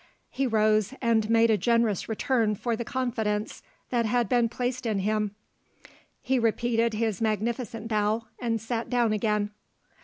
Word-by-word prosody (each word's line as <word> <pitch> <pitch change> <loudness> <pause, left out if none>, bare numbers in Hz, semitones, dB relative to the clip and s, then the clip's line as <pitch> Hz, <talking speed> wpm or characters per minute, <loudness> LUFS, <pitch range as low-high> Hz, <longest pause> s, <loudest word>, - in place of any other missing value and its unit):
He 270 - 0
rose, 215 +1 +2
and 225 -3 +1
made 230 0 +4
a 215 - +2
generous 230 -5 +1
return 220 -1 +1
for 235 +3 -1
the 235 - -4
confidence 225 -4 -2 0.3
that 235 -2 +1
had 240 +1 +1
been 240 -2 +2
placed 250 +1 -3
in 215 -2 0
him 210 +1 -1 0.9
he 260 0 +1
repeated 230 0 +1
his 220 -3 -1
magnificent 225 +1 -2
bow, 215 +1 0
and 230 -2 -1
sat 225 +1 -3
down 240 -3 +2
again. 210 -1 0
225 Hz, 150 wpm, -27 LUFS, 215-235 Hz, 0.9 s, made